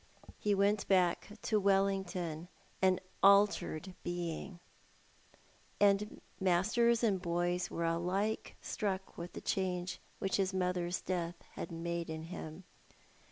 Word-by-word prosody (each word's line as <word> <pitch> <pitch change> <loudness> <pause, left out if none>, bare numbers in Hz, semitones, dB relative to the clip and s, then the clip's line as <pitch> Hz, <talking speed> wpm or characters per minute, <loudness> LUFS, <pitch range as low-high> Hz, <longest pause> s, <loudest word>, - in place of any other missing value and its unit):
He 205 -1 +2
went 200 +1 +2
back 185 0 +2
to 215 -2 +2
Wellington 190 -4 +1 0.3
an 185 -1 +4 0.2
altered 200 -3 +4
being, 175 +1 -4 1.2
and 205 +1 +3 0.2
masters 220 +6 +3
and 200 -5 +2
boys 175 0 0
were 170 - -2
alike 180 +6 -1
struck 190 -2 -3
with 170 +1 -7
the - - -6
change 185 -1 -1 0.2
which 195 - 0
his 190 -1 0
mother's 180 -1 0
death 175 -2 -2 0.2
had 170 - -6
made 170 0 -3
in 160 0 -4
him. 165 0 -7
185 Hz, 115 wpm, -34 LUFS, 175-195 Hz, 1.2 s, an